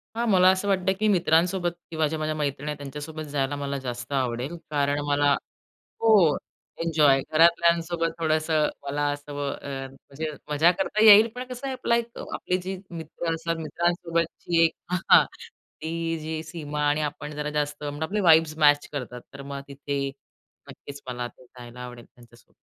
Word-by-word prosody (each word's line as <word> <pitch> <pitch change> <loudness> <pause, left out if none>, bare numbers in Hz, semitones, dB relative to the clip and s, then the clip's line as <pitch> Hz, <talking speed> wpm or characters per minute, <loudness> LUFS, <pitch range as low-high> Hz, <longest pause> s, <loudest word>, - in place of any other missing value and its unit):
हां, 235 +1 0
मला 185 -1 +6
असं 205 +2 -4
वाटतं 190 -1 +2
की 215 - +2
मित्रांसोबत 175 0 +2 0.2
किंवा 155 -1 +1
ज्या 160 +1 -3
माझ्या 155 0 -1
मैत्रिणी 145 0 -2
आहेत 150 - -4
त्यांच्यासोबत 150 +3 -7
जायला 140 0 -1
मला 140 -1 -3
जास्त 120 +2 -5
आवडेल. 130 +4 -1 0.2
कारण 145 0 +1
मला 145 0 +3 0.7
हो. 205 -9 +5 0.5
एन्जॉय 150 -5 +4
घरातल्यांसोबत 170 0 +3
थोडंसं 155 -1 +1 0.2
मला 145 +1 -2
असं 145 0 -8 0.2
अ, - - -8 0.2
म्हणजे 140 +3 -7 0.2
मजा 155 +4 +5
करता 215 +3 +1
येईल. 215 +1 +9
पण 250 +1 -5
कसं 250 +2 -6
आहे 265 - -2
आपला 235 -2 +1
एक 235 0 -4
आपली 180 0 -1
जी 190 +1 -5
मित्र 165 0 -4
असतात. 165 +1 -2
मित्रांसोबतची 170 +1 0
एक 165 - +1
अ, 180 - -2 0.2
हां - - +9 0.6
ती 165 0 -2
जी 155 0 -4
सीमा 150 -2 -5
आणि 150 +1 +1
आपण 150 0 -9
जरा 150 0 -3
जास्त 150 0 -2
मग 145 +1 -5
आपले 205 +6 -1
वाइब्स 160 -1 +5
मॅच 145 -1 +4
करतात. 125 -3 -5
तर 140 - -9
मग 140 0 -6
तिथे 140 0 -3 0.6
नक्कीच 140 0 -10
मला 125 -1 -3
जायला 125 -1 -13
आवडेल 125 -1 -9
त्यांच्यासोबत. 120 -1 -21
155 Hz, 165 wpm, -25 LUFS, 145-170 Hz, 0.7 s, येईल